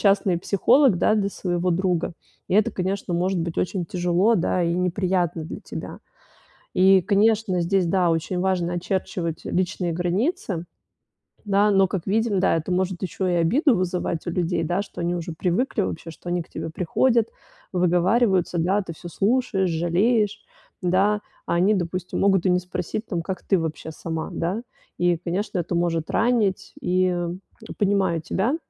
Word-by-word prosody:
частный 195 -3 +3
психолог, 235 +6 +4
да, 215 - +3
для 200 -2 +1
своего 180 -2 -1
друга. 180 -1 0 0.4
И - - 0
это, 215 +3 +4
конечно, 185 -1 -2
может 185 +2 0
быть 165 0 -4
очень 185 -1 -1
тяжело, 180 +5 +2
да, 180 +1 +1
и 170 - +1
неприятно 180 -2 0
для 160 - -7
тебя. - - -7 0.8
И, 190 0 +6
конечно, 205 -1 +2
здесь, 180 +1 +1
да, 180 0 +2
очень 165 +2 -1
важно 180 -2 0
очерчивать 175 -2 -3
личные 180 -1 -1
границы. 180 - -1 0.8
Да, 205 0 +3
но, 195 -1 +4
как 180 -2 -4
видим, 215 0 +1
да, - - +3
это 165 +3 -3
может 185 0 -1
ещё 190 0 -2
и 180 - +1
обиду 235 - +3
вызывать 180 -2 -2
у - - 0
людей, 170 -1 0
да, 175 +4 0
что 205 - -10
они 175 +1 0
уже 170 0 -5
привыкли 185 - 0
вообще, 165 -3 -4
что 175 - -11
они 175 0 0
к - - -22
тебе - - -5
приходят, 225 +8 +2 0.5
выговариваются, 180 +1 +2
да, 180 +4 +2
а - - 0
ты 170 - -6
всё 175 - -10
слушаешь, 200 0 +1
жалеешь. 195 +6 +1 0.4
Да, 195 +4 +2 0.3
а - - 0
они, 185 +5 +3
допустим, 180 -1 -3
могут 195 -2 +3
и - - +4
не 180 0 +3
спросить 180 +4 -4
там, 175 -4 -2
как 185 +1 -5
ты 195 - +3
вообще 160 -1 -4
сама, 160 0 -5
да? 185 +7 -2 0.4
И, 175 -1 +3
конечно, 185 +4 -2
это 175 +1 -2
может 165 -2 0
ранить. 220 -5 +1
И, 185 +1 +2
м, 175 0 -2 0.4
понимаю 195 -4 +2
тебя. 230 - 0
185 Hz, 170 wpm, -24 LUFS, 175-200 Hz, 0.8 s, И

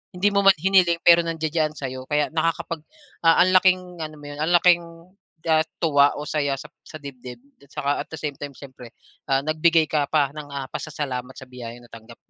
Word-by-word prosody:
Hindi 200 +3 +2
mo 200 - +3
man 195 - +8
hiniling, 175 0 +3
pero 170 0 +7
nandiya-diyan 155 -1 -1
sa'yo. 130 -2 -6
Kaya 150 0 +1
nakakapag, 165 0 -2 0.4
ah, 165 0 +5
ang 185 - +2
laking 185 0 +5 0.2
ano 155 0 -7
mo 145 - -13
'yon, 145 - -9
ang 160 +3 0
laking, 175 0 +5 0.7
ah, 155 0 +5 0.2
tuwa 145 -3 +4
o 150 - -5
saya 145 -3 -1
sa - - -9 0.2
sa 155 - -10
dibdib. 130 -4 -10 0.2
At 140 - -19
tsaka, 145 -2 -3
at - - -9
the 160 - -6
same 150 -1 -3
time, 145 -2 -7
siyempre, 130 -4 -13 0.3
ah, 135 0 +2
nagbigay 155 +1 +3
ka 145 -2 +1
pa 145 -3 +2
ng, 150 -1 -8
ah, 140 -1 -5
pasasalamat 135 -5 -5
sa - - -9
biyayang 120 -1 -9
natanggap. 115 0 -13
150 Hz, 200 wpm, -23 LUFS, 135-165 Hz, 0.7 s, man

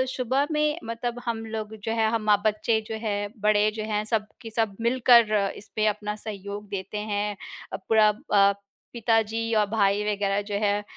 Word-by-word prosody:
सुबह 260 +3 +1
में 300 +1 +1
मतलब 235 +1 -4
हम 225 -1 -3
लोग 220 -1 -5
जो 225 - -2
हैं, 225 -1 +2
हम 230 0 0
माँ-बच्चे 215 +2 +1
जो 220 - -3
हैं, 205 0 -1
बड़े 210 0 +4
जो 215 - -2
हैं, 210 0 +1
सब 210 -1 -2
की 225 - -7
सब 220 -3 +1
मिलकर 235 -2 +5 0.2
इसपे 215 +1 -3
अपना 210 0 -4
सहयोग 205 0 -6
देते 195 +1 -5 0.2
हैं। 205 0 -1 0.4
अ, - - -1
पूरा 215 +2 +4 0.2
अ, 200 -1 +6 0.4
पिताजी 225 -1 0
और 210 - +3
भाई 205 -1 +2
वगैरह 200 -1 0
जो 205 - -3
हैं, 205 0 +1
215 Hz, 175 wpm, -26 LUFS, 205-230 Hz, 0.4 s, अ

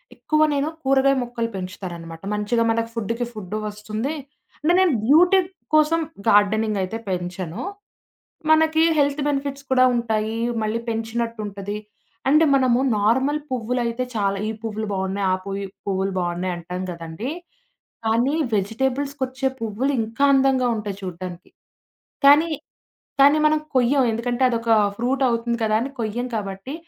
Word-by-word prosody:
ఎక్కువ 310 0 0
నేను 285 +2 0
కూరగాయ 270 0 +4
మొక్కలు 235 -1 -3
పెంచుతాననమాట. 175 -3 -7
మంచిగా 230 +3 +1
మనకు 230 0 -1
ఫుడ్‌కి 230 +2 -2
ఫుడ్డు 210 -1 -5
వస్తుంది. 215 +7 -4 0.5
అంటే, 320 +4 +3
నేను 355 -6 +4
బ్యూటీ 355 - +6 0.4
కోసం 310 +2 +4 0.3
గార్డెనింగ్ 210 0 +3
అయితే 220 +5 -4
పెంచను. 180 -1 -4 0.9
మనకి 315 0 +4 0.2
హెల్త్ 285 +1 +2
బెనిఫిట్స్ 280 0 -3
కూడా 255 0 +6
ఉంటాయి, 225 -1 -1 0.2
మళ్ళీ 220 +2 -1
పెంచినట్టుంటది. 225 -3 -3 0.5
అంటే 305 +3 +5
మనము 255 -2 +3 0.2
నార్మల్ 265 +8 +2
పువ్వులైతే 245 0 -1
చాలా 200 -1 0
ఈ - - -1
పువ్వులు 220 -1 -3
బావున్నాయి, 190 +1 -1
ఆ - - +3
పువి 195 0 -4 0.2
పువ్వులు 195 0 0
బావున్నాయి 175 +1 -2
అంటాం 180 +2 -5
కదండీ. 170 - -6 0.8
కానీ, 235 +5 +2 0.2
వెజిటబుల్స్‌కొచ్చే 265 +5 -1
పువ్వులు 230 +6 -1
ఇంకా 225 +5 -1
అందంగా 265 -2 +3
ఉంటాయి 205 -2 -4
చూడ్డానికి. 180 0 -7 0.7
కానీ, 295 +4 +7 0.7
కానీ, 285 +2 +7
మనం 310 0 +3 0.2
కొయ్యం. 255 +2 +4
ఎందుకంటే, 240 +3 -2
అదొక 230 -1 -1 0.3
ఫ్రూట్ 260 +3 0
అవుతుంది 235 0 -1
కదా! 215 -1 +1
అని 270 +4 -3
కొయ్యం 230 +3 -2
కాబట్టి, 200 +5 -5
230 Hz, 125 wpm, -22 LUFS, 205-270 Hz, 0.9 s, కానీ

